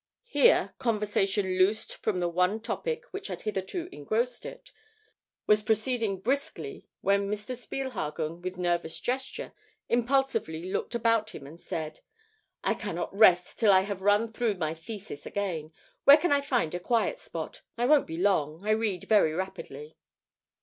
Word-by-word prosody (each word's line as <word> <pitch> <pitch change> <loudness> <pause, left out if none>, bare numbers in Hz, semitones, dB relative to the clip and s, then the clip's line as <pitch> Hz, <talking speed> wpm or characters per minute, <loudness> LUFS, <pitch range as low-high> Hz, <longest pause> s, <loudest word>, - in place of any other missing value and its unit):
Here, 480 0 +4
conversation 205 -4 0
loosed 200 +4 +2
from 200 -4 -1
the 175 - +1
one 180 +5 +1
topic 470 - -3
which 395 +1 -5
had - - -6
hitherto 215 - -3
engrossed 235 - -2
it, - - -11 0.7
was 210 0 +4
proceeding 220 -2 0
briskly, 280 - -2
when 200 0 +2
Mr. 210 +4 -3
Spielhagen, 175 - -4
with 185 0 -5
nervous 175 -2 -1
gesture, 260 +2 -3 0.4
impulsively 235 -9 0
looked 235 - -2
about 230 -2 +1
him 140 - -9
and 160 +5 -12
said: 155 -1 -5 0.6
"I - - +2
cannot 175 -2 -4
rest 180 -4 +5
till 220 -3 +6
I 190 -1 +6
have 195 -1 -4
run 205 +3 +3
through 225 -1 -1
my 160 -3 -2
thesis 170 -2 -8
again. 170 -6 -3 0.3
Where 285 +1 +10
can 350 +2 0
I 285 0 +4
find 245 - 0
a 175 - -2
quiet 235 - 0
spot? - - -6 0.2
I 240 - +1
won't 295 +2 +5
be 160 - -5
long; 175 -2 +1
I - - +3
read 215 -5 0
very 205 -8 +4
rapidly." 160 -4 -6
205 Hz, 155 wpm, -28 LUFS, 180-240 Hz, 0.7 s, Where